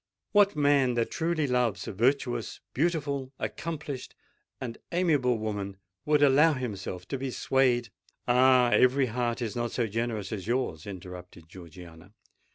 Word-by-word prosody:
What 205 -2 +4
man 140 -4 +3
that 115 -1 0
truly 165 -2 0
loves 125 -7 0
a - - -4
virtuous—beautiful—accomplished—and 135 - -3
amiable 150 -9 +2
woman, 100 -3 -4 0.3
would 150 -1 +3
allow 145 +3 +5
himself 95 -8 -5
to 135 - -3
be 135 0 -3
swayed——" 125 -2 +1 0.4
"Ah! 125 0 +5
every 130 +2 +4
heart 120 0 -2
is 110 -1 -4
not 120 -1 -2
so 120 - 0
generous 110 -2 -3
as 100 -3 -5
yours!" 120 - -2
interrupted 90 -3 -9
Georgiana. 85 +1 -13
125 Hz, 125 wpm, -28 LUFS, 105-140 Hz, 0.4 s, allow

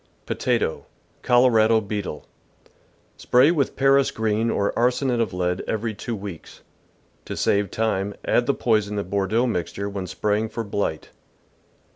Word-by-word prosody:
Potato. - - -1 0.2
— - - -38
Colorado 115 -3 +5
Beetle. 100 -7 -5 0.5
— - - -37
Spray 130 +6 +5
with 145 -6 0
Paris 135 0 +4
green 110 +1 0
or 100 -2 0
arsenate 125 +1 +1
of 110 -5 0
lead 90 0 -1
every 110 0 -2
two 115 +3 -5
weeks. 100 -5 -9 0.6
To - - -6
save 100 -1 +1
time, 105 -2 -1
add 120 - +2
the 140 - +2
poison 105 -4 +1
to 100 - -1
Bordeaux 100 +5 0
mixture 100 -2 -3
when 100 -2 -5
spraying 105 +3 -1
for 115 - -4
blight. 100 -6 -3
110 Hz, 145 wpm, -23 LUFS, 100-120 Hz, 0.6 s, Colorado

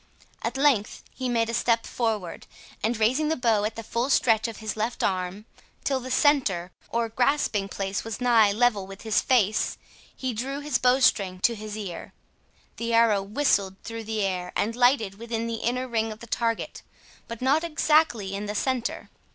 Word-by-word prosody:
At 230 +3 -3
length 270 -7 +2
he 255 -1 -3
made 230 -2 +1
a 230 - -3
step 230 -1 +1
forward, 215 -7 -3 0.3
and 225 +2 0
raising 260 +8 +2
the 320 - +1
bow 225 -5 +2
at 215 - -3
the 225 - -6
full 235 +4 -2
stretch 225 -4 +3
of 225 - -7
his 220 -1 -4
left 220 +2 -2
arm, 185 +2 -2 0.4
till 270 -2 0
the 255 0 -7
centre 250 - +2 0.2
or 235 0 0
grasping 240 -4 +1
place 195 +1 -3
was 225 +1 -5
nigh 230 -4 +5
level 210 -3 +2
with 195 0 -11
his 220 -2 +2
face, 215 -5 +2 0.4
he 260 -2 -3
drew 265 +5 -3
his 290 -2 -1
bowstring 250 -7 +3
to 235 - +3
his 215 -1 -7
ear. 190 -5 -7 0.6
The 230 0 -1
arrow 225 -3 +4
whistled 200 -3 +1
through 230 -1 -6
the 215 -1 -1
air, 180 -2 -2
and 225 +3 0
lighted 245 -5 +2
within 230 0 -3
the 230 -1 -3
inner 250 +2 -1
ring 225 -2 -1
of 215 - -8
the 235 - -10
target, 230 -1 -2 0.5
but 230 -1 -7
not 275 +5 +2
exactly 305 - +2
in 205 +1 -4
the 210 - -4
centre. 255 +1 -2
230 Hz, 185 wpm, -26 LUFS, 210-250 Hz, 0.6 s, nigh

